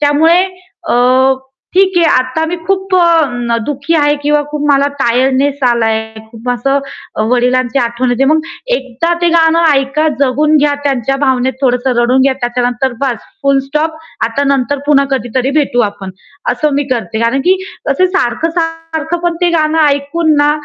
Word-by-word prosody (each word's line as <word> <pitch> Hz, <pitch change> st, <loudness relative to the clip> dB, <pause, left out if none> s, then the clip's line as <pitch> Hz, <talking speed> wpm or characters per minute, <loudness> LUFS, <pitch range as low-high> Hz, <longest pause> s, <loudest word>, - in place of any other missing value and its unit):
त्यामुळे 320 Hz, +5 st, +3 dB, 0.5 s
अ, -, -, +1 dB, 0.8 s
ठीक 380 Hz, 0 st, +3 dB
आहे 335 Hz, -, +4 dB
आता 255 Hz, +5 st, 0 dB
मी 350 Hz, +2 st, -3 dB
खूप 385 Hz, -1 st, -1 dB
अ, 290 Hz, -9 st, +2 dB
दुःखी 285 Hz, +2 st, -2 dB
आहे 290 Hz, -1 st, +2 dB
किंवा 295 Hz, 0 st, +2 dB
खूप 295 Hz, -1 st, -3 dB
मला 280 Hz, 0 st, +3 dB
टायर्डनेस 270 Hz, +3 st, +1 dB
आलाय 230 Hz, -2 st, +1 dB
आहे. 220 Hz, 0 st, -10 dB
खूप 230 Hz, +2 st, -9 dB
असं 270 Hz, +3 st, 0 dB, 0.5 s
वडिलांची 250 Hz, +1 st, +1 dB
आठवण 240 Hz, +1 st, -1 dB
येते. 245 Hz, +2 st, +1 dB
मग 310 Hz, +3 st, +3 dB, 0.4 s
एकदा 265 Hz, +6 st, -3 dB
ते 345 Hz, -, +2 dB
गाणं 330 Hz, 0 st, +3 dB
ऐका 275 Hz, +3 st, 0 dB
जगून 300 Hz, +3 st, +2 dB
घ्या 290 Hz, 0 st, +2 dB
त्यांच्या 270 Hz, -1 st, 0 dB
भावनेत 260 Hz, -1 st, +1 dB
थोडस 250 Hz, -1 st, 0 dB
रडून 250 Hz, +1 st, +2 dB
घ्या. 270 Hz, 0 st, +3 dB
त्याच्यानंतर 245 Hz, +1 st, -1 dB
बास 265 Hz, -4 st, 0 dB, 0.3 s
फुल 275 Hz, 0 st, +3 dB
स्टॉप 310 Hz, +2 st, -1 dB, 0.3 s
आता 275 Hz, +5 st, -1 dB
नंतर 275 Hz, 0 st, 0 dB
पुन्हा 280 Hz, -2 st, +4 dB
कधीतरी 255 Hz, 0 st, -1 dB
भेटू 255 Hz, -4 st, 0 dB
आपण, 195 Hz, -2 st, -9 dB, 0.4 s
अस -, -, -4 dB
मी 285 Hz, +1 st, 0 dB
करते. 225 Hz, -2 st, -3 dB
कारण 235 Hz, +4 st, +1 dB
की 375 Hz, +1 st, +4 dB, 0.3 s
अ, -, -, +3 dB
सारखं-सारखं 325 Hz, 0 st, -2 dB
पण 345 Hz, -1 st, 0 dB
ते 355 Hz, -, +3 dB
गाणं 315 Hz, -1 st, +1 dB
ऐकून 295 Hz, +3 st, +1 dB
ना, 290 Hz, 0 st, +3 dB
280 Hz, 160 wpm, -13 LUFS, 250-315 Hz, 0.8 s, आहे